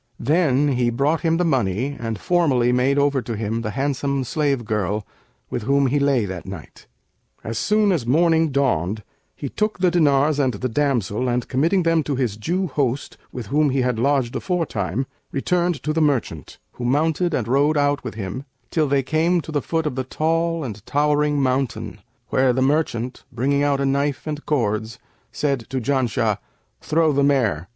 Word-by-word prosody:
Then 145 -1 +2
he 125 -3 +1
brought 140 +7 +1
him 165 -1 +2
the 180 - +1
money 130 - 0
and 115 -2 -3
formally 140 -9 +2
made 130 +3 +2
over 140 -1 +2
to 115 -1 -5
him 110 +2 -2
the 110 - -3
handsome 140 0 0
slave 140 -3 -1
girl 105 -1 -1 0.5
with 120 - -2
whom 140 +4 +2
he 140 +3 +1
lay 140 -5 +2
that 95 -2 -6
night. 95 -5 -10 0.6
As 110 0 -3
soon 210 -1 +2
as 165 -9 0
morning 160 +5 +3
dawned, 110 - 0 0.3
he 145 - -5
took 215 +9 -1
the 180 -1 +2
diners 150 -3 +3
and 130 -5 +1
the 130 +5 -2
damsel 125 -3 0
and, 120 0 -1
committing 165 +8 +2
them 165 -1 +3
to 145 -1 -2
his 125 -6 -1
Jew 175 - -1
host 135 -4 -2
with 125 -3 -6
whom 150 0 +3
he 135 0 +1
had 125 -3 0
lodged 135 -2 +1
afore 180 -3 -1
time, 100 - -2 0.3
returned 175 +3 0
to 155 - -1
the 160 - +1
merchant, 130 - -1
who - - -8
mounted 155 +6 +1
and 115 - -2
rode 145 +5 +2
out 145 0 +1
with 120 -4 -6
him, 105 +5 -5 0.3
till 155 -3 +1
they 140 0 +1
came 160 +5 +1
to 160 - -9
the 145 -2 0
foot 160 +2 -1
of 150 - -1
the 130 +1 -2
tall 165 +4 0
and 110 -6 -6
towering 150 0 +2
mountain, 130 -1 -1 0.3
where 130 -1 +3
the 130 - 0
merchant, 130 -4 -1
bringing 140 +5 0
out 145 -1 +2
a 140 - +1
knife 140 +1 0
and 150 -1 -5
cords, 110 -4 -1 0.3
said 140 -3 0
to 135 0 -2
Janshah, 115 -5 0 0.4
'Throw 160 0 +2
the 140 0 +2
mare.' 110 - +1
140 Hz, 185 wpm, -22 LUFS, 120-150 Hz, 0.6 s, morning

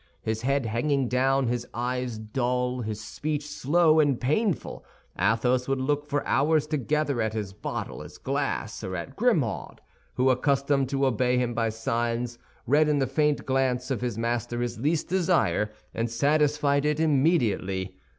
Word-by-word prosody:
His 110 0 -2
head 140 +1 +1
hanging 125 +4 0
down, 135 +2 +2
his 120 0 -2
eye 125 +1 -1 0.2
dull, 125 0 0
his 110 -2 -4
speech 150 +6 -4
slow 160 +2 +3
and 145 -5 +3
painful, 170 - -1 0.3
Athos 120 +6 +1
would 135 -1 0
look 145 +2 -1
for 145 0 -1
hours 150 +2 +2
together 150 -2 0
at 110 0 -1
his 105 -3 -4
bottle, 105 - -5
his - - -11
glass, - - -2
or 95 0 -4
at 135 +10 -6
Grimaud, 170 - 0 0.4
who, 130 +1 +3
accustomed 140 0 +1
to 135 0 +1
obey 125 0 +2
him 125 -1 0
by 115 -1 0
signs, 115 +2 -2 0.3
read 150 +3 +4
in 150 - +2
the 135 - +2
faint 150 +3 +1
glance 130 -1 0
of 125 - -1
his 120 -4 -2
master 120 +1 -2
his 120 -2 -3
least 150 +5 0
desire, 175 - +1 0.2
and 115 +1 -1
satisfied 145 +3 +2
it 150 0 +1
immediately. 130 - +1
130 Hz, 160 wpm, -26 LUFS, 120-145 Hz, 0.4 s, read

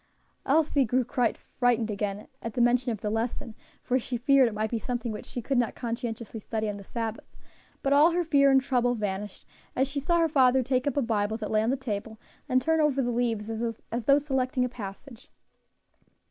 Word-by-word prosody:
Elsie 290 -1 +3
grew 255 +2 +1 0.6
frightened 240 -3 +2
again 205 0 -3
at 230 - -5
the - - -1
mention 240 +1 +3
of 215 -3 -5
the 210 - -2
lesson, 225 0 -3 0.3
for 255 +1 +1
she 245 0 -4
feared 270 +1 +4
it 225 - -3
might 215 +1 -2
be 230 - -1
something 240 -1 -3
which 210 - -7
she 245 - -5
could 270 0 +1
not 235 -3 0
conscientiously 235 -2 -5
study 220 +1 -3
on 205 -1 -3
the 200 - -10
Sabbath; 225 +1 -6 0.5
but 275 - +2
all 295 +4 +6
her 350 +1 0
fear 280 -4 +4
and 270 0 +6
trouble 245 -2 +1
vanished 205 -2 -4 0.3
as 265 +2 +2
she 280 +1 -3
saw 340 +5 +1
her 330 -1 +3
father 260 -3 +4
take 255 +1 0
up 285 - -1
a 280 - +3
Bible 220 -1 0
that 215 -2 -5
lay 215 0 +3
on 220 - 0
the 270 - +1
table, 220 -3 -5 0.3
and 255 - +4
turn 320 0 +2
over 295 -3 +2
the 245 -2 +1
leaves 230 -3 -1 0.4
as 235 0 -3
though 280 0 +6
selecting 265 -2 0
a - - -3
passage. 225 +2 -9
245 Hz, 210 wpm, -27 LUFS, 220-270 Hz, 0.6 s, all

